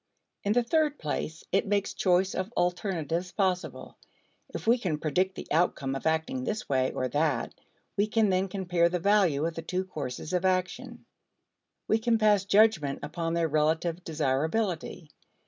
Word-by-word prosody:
In 205 Hz, -, +1 dB
the 245 Hz, +1 st, +3 dB
third 300 Hz, +3 st, +1 dB
place, 155 Hz, +1 st, -4 dB
it -, -, +1 dB
makes 200 Hz, -1 st, 0 dB
choice 185 Hz, +1 st, +2 dB
of 185 Hz, +4 st, -3 dB
alternatives 175 Hz, -1 st, -1 dB
possible. 185 Hz, -3 st, -2 dB, 0.5 s
If -, -, -6 dB
we 235 Hz, +2 st, +4 dB
can 175 Hz, -9 st, -1 dB
predict 180 Hz, +5 st, 0 dB
the -, -, -7 dB
outcome 150 Hz, -4 st, +1 dB
of 135 Hz, +3 st, -3 dB
acting 160 Hz, +12 st, 0 dB
this 215 Hz, -3 st, -3 dB
way 130 Hz, -1 st, +1 dB
or 130 Hz, -, -2 dB
that, 145 Hz, -3 st, 0 dB, 0.4 s
we 205 Hz, +1 st, +2 dB
can 215 Hz, -2 st, +2 dB
then 185 Hz, +1 st, +1 dB
compare 180 Hz, -3 st, +1 dB
the 180 Hz, -, -1 dB
value 180 Hz, -6 st, +3 dB
of 165 Hz, -, -2 dB
the 165 Hz, -, -5 dB
two 185 Hz, +3 st, -2 dB
courses 150 Hz, -2 st, -6 dB
of 180 Hz, 0 st, +1 dB
action; 190 Hz, +7 st, -1 dB, 0.8 s
we 220 Hz, -, +2 dB
can 230 Hz, 0 st, +2 dB
pass 210 Hz, -3 st, +3 dB
judgment 195 Hz, -9 st, +3 dB
upon 165 Hz, +1 st, -3 dB
their 170 Hz, -1 st, +1 dB
relative 160 Hz, +3 st, 0 dB
desirability. 160 Hz, +3 st, -1 dB
180 Hz, 165 wpm, -28 LUFS, 160-205 Hz, 0.8 s, we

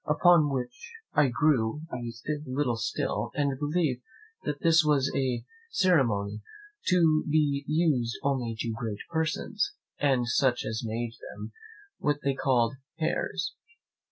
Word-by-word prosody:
upon 155 Hz, 0 st, +5 dB
which 140 Hz, -, -4 dB, 0.2 s
I 150 Hz, -, +5 dB
grew 125 Hz, 0 st, +2 dB
a -, -, -3 dB, 0.5 s
little 130 Hz, -2 st, 0 dB
still, 115 Hz, -, -2 dB
and 140 Hz, -2 st, 0 dB
believed 150 Hz, -4 st, 0 dB, 0.6 s
this 165 Hz, 0 st, +5 dB
was 145 Hz, -3 st, +2 dB
a 130 Hz, -3 st, 0 dB, 0.2 s
ceremony 115 Hz, -, +2 dB, 0.5 s
to 165 Hz, -4 st, +4 dB
be 145 Hz, -2 st, +2 dB
used 150 Hz, -7 st, +2 dB
only 125 Hz, -5 st, 0 dB
to 115 Hz, -, -2 dB
great 110 Hz, -3 st, -4 dB
persons, 160 Hz, -, -1 dB, 0.3 s
and 130 Hz, -4 st, +2 dB
such 120 Hz, +2 st, +2 dB
as 110 Hz, 0 st, -2 dB
made 115 Hz, +1 st, -3 dB
them, -, -, -8 dB, 0.5 s
what 145 Hz, 0 st, +1 dB
they 140 Hz, -, +2 dB
called 130 Hz, -2 st, +1 dB, 0.2 s
Heirs. 160 Hz, +1 st, -1 dB
140 Hz, 125 wpm, -28 LUFS, 120-155 Hz, 0.6 s, upon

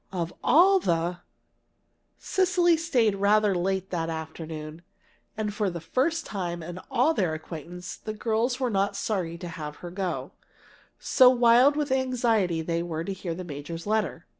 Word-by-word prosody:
of 175 Hz, -3 st, -3 dB
all 370 Hz, +8 st, +6 dB
the 175 Hz, -, -1 dB, 0.5 s
" -, -, -46 dB, 0.2 s
Cecily 355 Hz, -2 st, +2 dB
stayed 260 Hz, -10 st, +2 dB
rather 205 Hz, +1 st, +3 dB
late 190 Hz, +1 st, -1 dB
that 165 Hz, -2 st, -2 dB
afternoon. 160 Hz, 0 st, -6 dB, 0.6 s
And 210 Hz, -1 st, -2 dB
for 210 Hz, -1 st, 0 dB
the 170 Hz, -1 st, -5 dB
first 300 Hz, -, -1 dB
time 175 Hz, -4 st, -4 dB
in 175 Hz, +2 st, -7 dB
all 270 Hz, +4 st, +3 dB
their 180 Hz, -, 0 dB
acquaintance, 170 Hz, +3 st, -8 dB
the 215 Hz, -, -6 dB
girls 230 Hz, +3 st, 0 dB
were 255 Hz, -3 st, 0 dB
not 200 Hz, 0 st, 0 dB
sorry 185 Hz, -5 st, -2 dB
to 175 Hz, 0 st, -7 dB
have 150 Hz, -3 st, -6 dB
her 175 Hz, -, -6 dB
go, 185 Hz, 0 st, -3 dB, 0.7 s
so 255 Hz, -2 st, +5 dB
wild 245 Hz, +3 st, +5 dB
with 295 Hz, -2 st, -1 dB
anxiety 230 Hz, -10 st, +1 dB, 0.2 s
were 165 Hz, -2 st, -3 dB
they 195 Hz, -, -3 dB
to 190 Hz, -, -13 dB
hear 170 Hz, -3 st, -3 dB
the 185 Hz, -, -6 dB
major's 165 Hz, +1 st, -7 dB
letter. 215 Hz, +1 st, -1 dB
195 Hz, 165 wpm, -26 LUFS, 170-245 Hz, 0.7 s, all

